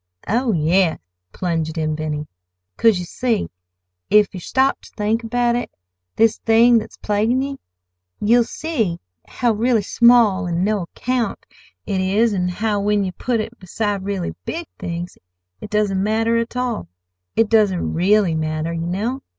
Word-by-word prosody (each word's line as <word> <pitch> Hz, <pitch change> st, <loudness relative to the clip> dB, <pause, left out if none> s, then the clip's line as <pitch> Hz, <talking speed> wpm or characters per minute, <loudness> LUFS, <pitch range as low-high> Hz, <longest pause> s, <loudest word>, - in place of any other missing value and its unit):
"Oh, 240 Hz, +3 st, +1 dB
yes," 170 Hz, 0 st, +2 dB, 0.3 s
plunged 165 Hz, -, -2 dB
in 155 Hz, -1 st, 0 dB
Benny; 150 Hz, -1 st, -3 dB, 0.5 s
"'cause, 225 Hz, -4 st, +4 dB
you 180 Hz, -, -4 dB
see, 230 Hz, +3 st, -1 dB, 0.6 s
if 210 Hz, -1 st, +4 dB
yer 185 Hz, -, -6 dB
stop 265 Hz, +8 st, +1 dB
ter -, -, -15 dB
think 220 Hz, +2 st, 0 dB
about 240 Hz, +1 st, +1 dB
it—this 90 Hz, -, -2 dB
thing 230 Hz, +1 st, +5 dB
that's -, -, -10 dB
plaguin' 215 Hz, +4 st, +1 dB
ye—you'll 90 Hz, -, -2 dB
see 225 Hz, -, -2 dB, 0.3 s
how 240 Hz, -2 st, 0 dB
really 225 Hz, 0 st, +1 dB
small 235 Hz, -4 st, +4 dB
an' 170 Hz, +1 st, -1 dB
no 210 Hz, 0 st, +1 dB
account 235 Hz, +6 st, -3 dB, 0.4 s
it 190 Hz, -1 st, -1 dB
is, 205 Hz, +4 st, +2 dB
an' 180 Hz, -2 st, 0 dB
how, 205 Hz, +3 st, -1 dB
when 205 Hz, 0 st, +1 dB
you 185 Hz, -, -2 dB
put 235 Hz, +6 st, -2 dB
it 225 Hz, +2 st, -5 dB
beside 200 Hz, +2 st, -2 dB
really 195 Hz, -3 st, -3 dB
big 335 Hz, +1 st, -4 dB
things 175 Hz, +1 st, -5 dB, 0.4 s
it -, -, -8 dB
doesn't 205 Hz, -3 st, +1 dB
matter 225 Hz, +3 st, +1 dB
at 230 Hz, +1 st, -2 dB
all—it 90 Hz, -, -3 dB
doesn't 205 Hz, -5 st, +2 dB
really 190 Hz, +1 st, +3 dB
matter, 155 Hz, +1 st, -2 dB
ye 165 Hz, 0 st, -3 dB
know. 220 Hz, +9 st, -2 dB
205 Hz, 150 wpm, -20 LUFS, 170-230 Hz, 0.6 s, thing